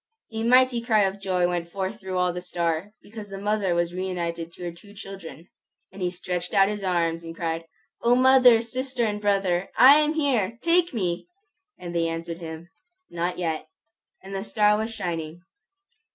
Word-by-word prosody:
A 220 - -3
mighty 250 +1 +4
cry 225 -3 +3
of 195 0 0
joy 180 -2 +1
went 175 -1 -3
forth 195 +3 -4
through 190 -1 -4
all 180 -1 +1
the 180 - -5
star, 170 +1 -2
because 210 -1 -10
the 195 - -7
mother 200 -3 0
was 170 0 0
reunited 170 -2 -3
to 180 - -10
her 175 - -3
two 200 +5 -16
children. 190 -4 -10 0.4
And 195 - -11
he 180 - +1
stretched 180 0 -4
out 195 0 +5
his 210 -1 -4
arms 170 -2 0
and 165 0 -8
cried, 165 -1 -3 0.4
"O 240 +1 +4
mother, 255 -2 +6
sister, 255 +1 -2
and 210 -1 -2
brother, 195 -3 +1
I 275 +3 +9
am 305 0 +2
here! 240 -8 +1
Take 340 +1 +3
me!" 185 - -2 0.5
And 175 -1 -7
they 165 -1 +1
answered 165 +1 -5
him, 160 +1 -8 0.4
"Not 175 +1 -2
yet." 160 -3 -2 0.6
And 195 +1 -9
the 195 0 -3
star 210 -1 +3
was 220 +2 -2
shining. 170 -4 -5
190 Hz, 180 wpm, -25 LUFS, 170-220 Hz, 0.6 s, I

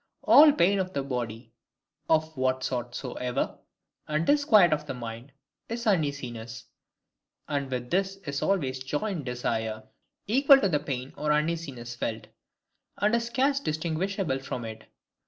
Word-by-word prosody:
All 300 0 +8
pain 195 -4 +3
of 185 0 -2
the 140 - -1
body, 120 -3 -5 0.6
of 160 0 +2
what 130 0 0
sort 120 -2 -3
soever, 125 0 -3 0.5
and 155 +2 0
disquiet 215 - +5
of 150 0 -3
the 135 - -4
mind, 120 +2 -7 0.4
is 235 +1 -4
uneasiness: 130 - -2 0.8
and 140 -2 -2
with 125 -1 -4
this 190 +2 +1
is 140 -1 -3
always 140 -10 0
joined 150 +3 -3
desire, 110 -3 -2 0.4
equal 275 +5 +6
to 200 - +1
the 150 -4 +1
pain 130 -2 -5
or 150 0 0
uneasiness 150 -6 -1
felt; 115 -1 -4 0.7
and 210 +3 +1
is 235 0 -1
scarce 270 +3 +1
distinguishable 165 - -2
from 125 -3 -5
it. 110 0 -8
145 Hz, 140 wpm, -27 LUFS, 125-190 Hz, 0.8 s, All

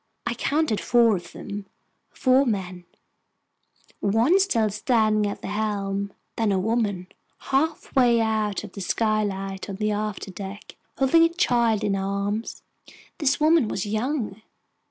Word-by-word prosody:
I 235 - 0
counted 275 -1 0
four 235 -3 +4
of 175 -2 -7
them—four 255 +6 -2
men, 185 -5 -3 1.1
one 230 - +3
still 230 - +2
standing 215 -2 +2
at - - -7
the - - -4
helm—then 200 0 -2
a 195 - +2
woman, 205 -2 0 0.3
halfway 270 -4 +1
out 220 -2 0
of - - -10
a 200 - -6
skylight 195 -2 -1
on 195 - -4
the 210 +2 -1
afterdeck, 205 -1 -5 0.2
holding 270 +5 +5
a 330 - +5
child 235 - +1
in 205 -1 +1
her 195 - -1
arms. 200 +3 -3 0.6
This 285 -3 +2
woman 310 -4 +4
was 195 -2 -3
young. 220 0 -2
215 Hz, 130 wpm, -24 LUFS, 200-240 Hz, 1.1 s, holding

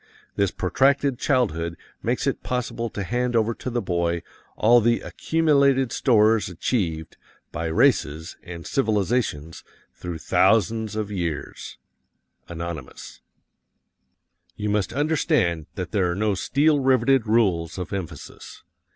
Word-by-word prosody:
This 100 -1 +2
protracted 135 +8 +1
childhood 85 - 0 0.2
makes - - -1
it - - -1
possible 120 -2 -3
to 100 - -5
hand 120 +3 -1
over 115 0 +2
to 125 - -6
the 120 -1 -2
boy 85 -1 -1 0.3
all 120 +2 +5
the 115 +1 +2
accumulated 140 -5 +2
stores 110 -5 +3
achieved 85 -3 -2 0.3
by 85 0 -3
races 80 - +1
and 85 -2 -9
civilizations 105 - -1 0.3
through 90 -2 -6
thousands 110 +5 +2
of 105 -1 -3
years. 85 -6 -5 0.7
Anonymous. 85 -4 -7 1.3
You 105 +2 -3
must 100 -2 0
understand 135 - 0
that 90 -2 -5
there 95 -5 +1
are 85 - -1
no 105 +1 +1
steel 145 +9 +2
riveted 130 -2 +3
rules 95 -8 +1
of 90 0 -5
emphasis. 95 -4 -8
105 Hz, 120 wpm, -24 LUFS, 85-125 Hz, 1.3 s, all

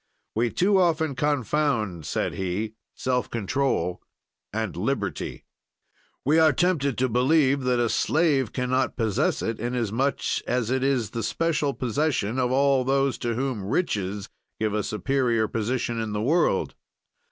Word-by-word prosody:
"We 115 +2 +1
too 190 - +3
often 160 -4 +2
confound," 125 - 0
said - - -1
he, 95 +4 -3 0.2
"self 125 -1 -1
control 110 -5 -1 0.5
and - - -3
liberty. - - -3 0.8
"We 155 +4 +4
are 160 -1 +6
tempted 145 -4 +1
to 130 - +2
believe 135 +3 +3
that 125 -1 +2
a 120 - +2
slave 140 -2 +2
can 125 -1 -2
not 130 0 +1
possess 110 -5 0
it, 115 -1 -2
inasmuch 120 +3 -1 0.3
as 125 -1 0
it 130 0 +1
is 130 -6 +1
the 115 - -3
special 150 +2 0
possession 130 -3 0
of 125 -1 +1
all 135 0 +3
those 135 -1 +1
to 120 -1 -1
whom 130 -5 -2
riches 100 - -1 0.3
give 110 -1 0
a 105 - +1
superior 115 0 0
position 115 +1 -2
in 110 -2 -3
the 105 - -1
world. 150 - +2
125 Hz, 145 wpm, -25 LUFS, 110-140 Hz, 0.8 s, are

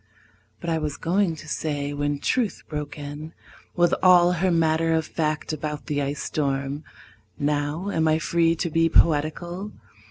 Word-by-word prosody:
But 170 - -3
I 160 - +1
was 150 -2 -3
going 175 0 +1
to 155 - -11
say 145 -2 -2
when 145 0 -1
Truth 230 - -1
broke 150 -1 -5
in 145 +2 -7 0.4
With 175 -1 +3
all 180 -1 +6
her 180 +1 +1
matter 165 -1 +2
of 160 -1 0
fact 155 -1 -2
about 150 0 -4
the 145 -2 -1
ice 140 +1 -3
storm 140 0 -2 0.5
(Now 150 +6 -1
am 160 -3 +1
I 155 0 +4
free 165 +1 +2
to 170 0 -2
be 165 +1 +3
poetical?) 170 +6 +1
155 Hz, 160 wpm, -24 LUFS, 145-170 Hz, 0.5 s, all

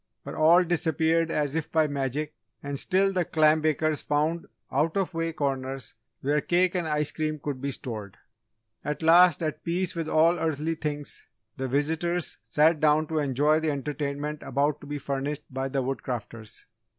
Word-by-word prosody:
But - - -7
all 165 +4 +5
disappeared 165 -1 +1
as 150 -3 -1
if 160 -1 -3
by 160 -1 +3
magic 145 +1 -2 0.3
and 140 -1 -3
still 195 +4 +2
the 180 -1 +1
clam 155 -1 +3
bakers 155 0 +1
found 155 +3 0 0.2
out 155 +6 +1
of 190 -2 -1
way 165 0 -1
corners 135 -5 -3 0.3
where 145 +2 +1
cake 180 +3 +2
and 175 -3 -1
ice 150 -1 0
cream 155 -1 -2
could 145 -3 -5
be 140 - -2
stored! 110 -7 -6 0.7
At 150 +1 -3
last, 170 0 +6
at 155 - -3
peace 175 +2 0
with 165 -1 -3
all 165 +2 +4
earthly 160 0 -1
things, 150 -2 -4 0.3
the 130 - -2
visitors 160 +6 0
sat 155 +1 +3
down 155 +1 +3
to 160 -1 0
enjoy 145 +2 +2
the 160 -1 -1
entertainment 145 +1 -3
about 145 +1 0
to 145 - -11
be 145 0 -3
furnished 140 +1 -3
by 135 +1 -2
the 135 -1 -1
Woodcrafters. 120 -4 -5
150 Hz, 170 wpm, -27 LUFS, 140-160 Hz, 0.7 s, last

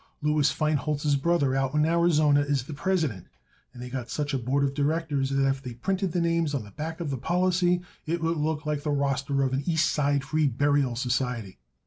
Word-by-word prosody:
Louis 150 -1 +3
Feinholz's 150 -1 0
brother 140 -2 +1
out 135 +1 0
in 150 0 +3
Arizona 160 -3 +3
is 145 -3 0
the 150 - -8
president, 145 - -1 0.4
and 125 - -13
they - - -6
got 125 -2 -5
such 150 -1 -2
a 135 - +1
board 135 +4 0
of 140 -1 0
directors 145 -1 0
that 135 0 +2
if 135 0 0
they 125 -3 -7
printed 190 - -1
the 175 - 0
names 165 -3 +1
on 130 - -2
the 105 - -13
back 160 - -5
of 155 -4 -3
the 135 - -3
policy 175 +3 +1 0.3
it 170 +2 0
would 165 0 0
look 155 0 -1
like 150 -1 -1
the 150 - -3
roster 140 -1 0
of 130 -1 0
an 135 - 0
East 160 -2 +2
Side 145 -1 +1
free 155 +1 +1
burial 140 0 +1
society. 125 - -2
145 Hz, 210 wpm, -27 LUFS, 135-160 Hz, 0.4 s, Louis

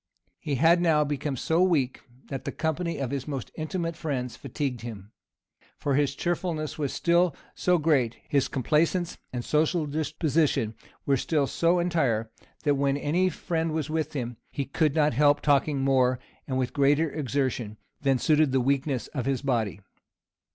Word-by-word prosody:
He 150 -4 -2
had 165 +6 +4
now 160 -3 +4
become 145 -1 -2
so 160 +7 +1
very 185 +1 +5
weak, 135 -7 0 0.3
that 135 -2 -4
the - - -3
company 165 +2 -2
of 135 -3 -3
his 140 -1 -3
most 135 -5 -4
intimate 165 +1 -3
friends 135 -7 -3
fatigued 135 -2 -4
him; 110 -3 -8 0.7
for 140 - -1
his 140 0 +1
cheerfulness 170 -3 -2
was 145 -3 -1
still 170 -2 +2 0.2
so 180 -1 +2
great, 145 -8 +2
his 140 -2 +2
complaisance 165 +6 0
and 125 -1 -4
social 155 +2 +2
disposition 150 -5 0 0.3
were 140 -1 +3
still 145 +2 +1
so 170 +5 +2
entire, 135 -11 0 0.3
that 145 -3 +3
when 140 0 +1
any 170 +6 +1
friend 165 -2 -2
was 155 -1 -2
with 160 0 -1
him, 120 -4 -4
he 140 - -3
could 150 +1 +1
not 150 -3 +3
help 145 +3 +4
talking 145 -1 +2
more, 130 -2 +3 0.3
and 130 - -1
with 130 -2 -1
greater 145 +2 +3
exertion, 130 -6 -2 0.2
than 135 -2 +3
suited 155 +1 +3
the 130 - +3
weakness 135 0 0
of 130 -4 -4
his 135 -1 0
body. 115 -7 -1
145 Hz, 165 wpm, -27 LUFS, 130-160 Hz, 0.7 s, very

